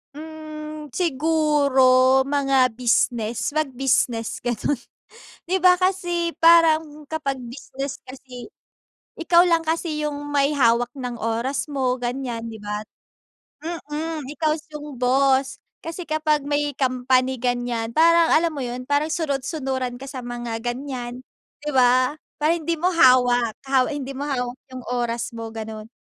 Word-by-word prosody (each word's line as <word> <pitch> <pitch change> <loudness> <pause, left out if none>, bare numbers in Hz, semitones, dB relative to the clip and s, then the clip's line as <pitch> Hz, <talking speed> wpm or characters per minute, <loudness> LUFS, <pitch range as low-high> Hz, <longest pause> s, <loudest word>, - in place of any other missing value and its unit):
Hmm, 310 -1 -8
siguro, 280 -5 +3
mga 270 -3 +2
business, 235 0 0
mag-business, 265 -5 0
ganun. 240 +2 -1 0.7
Di 380 - +2
ba, 365 0 +6
kasi 350 -2 -1
parang 320 -2 +4
kapag 275 -5 -3
business 270 +2 -6
kasi, 255 -1 -10 0.7
ikaw 340 +1 +5
lang 335 -2 +2
kasi 315 -2 -1
yung 290 0 -5
may 285 0 +2
hawak 240 -3 +3
ng 250 -3 -5
oras 230 +5 -2
mo 260 -4 -1
ganyan, 240 -2 -4
'di 220 -2 -9
ba? 210 +1 -4 0.8
Mm, 320 -1 -4 0.2
ikaw 310 -1 -1
yung 295 -4 -8
boss. 265 +1 +2 0.2
Kasi 330 +2 -6
kapag 310 -2 0
may 290 0 -1
company 255 -1 +1
ganyan, 245 -2 -2
parang 335 +1 +5
alam 330 +1 +3
mo 290 - -6
yun, 250 0 -4
parang 285 +3 +1
sunod-sunuran 270 -5 -2
ka 270 +2 -9
sa 260 - -6
mga 240 -2 -5
ganyan, 245 0 -5 0.4
'di 300 - -2
ba? 255 +3 +3 0.2
Parang 320 +3 +1
hindi 335 - +1
mo 350 +3 0
hawak, 250 -7 +4
haw 265 -2 +2
hindi 285 -3 -4
mo 280 +2 -5
hawak 250 -2 -3 0.2
yung 255 - -7
oras 240 -1 -2
mo, 225 -1 -8
ganon. 220 -1 -7
270 Hz, 135 wpm, -23 LUFS, 245-310 Hz, 0.8 s, ba